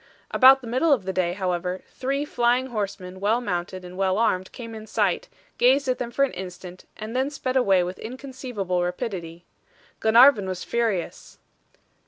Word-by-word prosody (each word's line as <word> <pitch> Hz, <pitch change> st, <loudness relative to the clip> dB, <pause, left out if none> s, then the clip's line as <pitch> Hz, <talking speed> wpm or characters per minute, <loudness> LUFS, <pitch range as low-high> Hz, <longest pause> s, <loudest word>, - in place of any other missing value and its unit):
About 265 Hz, +1 st, +7 dB
the 245 Hz, -, -9 dB
middle 260 Hz, +7 st, +1 dB
of 240 Hz, -10 st, +2 dB
the 190 Hz, -, -2 dB
day, 175 Hz, -1 st, 0 dB
however, 180 Hz, -1 st, -2 dB
three 275 Hz, +3 st, -2 dB
flying 245 Hz, -1 st, +1 dB
horsemen, 195 Hz, -3 st, -4 dB
well 210 Hz, +4 st, +2 dB
mounted 185 Hz, -4 st, -4 dB
and 180 Hz, 0 st, -10 dB
well 190 Hz, 0 st, +1 dB
armed 190 Hz, -5 st, 0 dB
came 230 Hz, -2 st, -9 dB
in 220 Hz, 0 st, -9 dB
sight, -, -, 0 dB, 0.3 s
gazed 265 Hz, +3 st, +4 dB
at 255 Hz, -, 0 dB
them 245 Hz, -, -3 dB
for 275 Hz, +3 st, +2 dB
an 275 Hz, -, -6 dB
instant, 180 Hz, 0 st, -9 dB
and 220 Hz, +2 st, -7 dB
then 265 Hz, +2 st, +1 dB
sped 270 Hz, -3 st, -4 dB
away 195 Hz, -8 st, +4 dB
with 180 Hz, +1 st, -6 dB
inconceivable 245 Hz, -7 st, -4 dB
rapidity. 175 Hz, -3 st, -4 dB, 0.5 s
Glenarvan 225 Hz, -2 st, +6 dB
was 185 Hz, -1 st, -4 dB
furious. 225 Hz, -7 st, -2 dB
215 Hz, 170 wpm, -24 LUFS, 185-255 Hz, 0.5 s, About